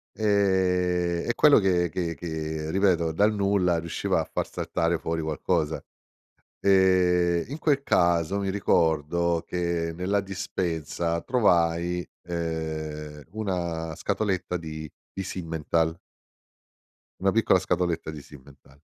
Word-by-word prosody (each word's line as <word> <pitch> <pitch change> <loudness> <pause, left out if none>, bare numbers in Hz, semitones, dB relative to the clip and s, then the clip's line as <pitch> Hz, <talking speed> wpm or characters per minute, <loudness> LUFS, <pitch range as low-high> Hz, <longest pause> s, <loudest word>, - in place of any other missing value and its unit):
Ehm, 90 -4 +1
è 120 - +1
quello 150 -5 +6
che 90 -3 +2
che 85 0 -3
che 80 -1 -4
ripeto, 90 -3 +2
dal 105 +6 +3
nulla 100 -4 +2
riusciva 85 0 -1
a - - -1
far - - -1
saltare 85 0 -1
fuori 80 0 -2
qualcosa. 80 0 -1 0.8
Ehm, 90 -3 +3
in 145 +4 -5
quel 140 -3 +2
caso 85 - +2
mi 100 -1 -1
ricordo 85 -2 +1
che 85 -2 -1
nella 95 +3 0
dispensa 85 -4 -2
trovai, 90 -7 +1 0.2
ehm, 80 -3 -4
una 85 -6 -3
scatoletta 95 -2 -1
di 80 -2 -7 0.3
di 95 - -3
Simmenthal 80 -2 -1 1.2
una 95 +1 +3
piccola 110 -2 +4
scatoletta 90 -3 -1
di 75 -2 -8
Simmenthal. 70 -1 -17
85 Hz, 115 wpm, -26 LUFS, 80-95 Hz, 1.2 s, quello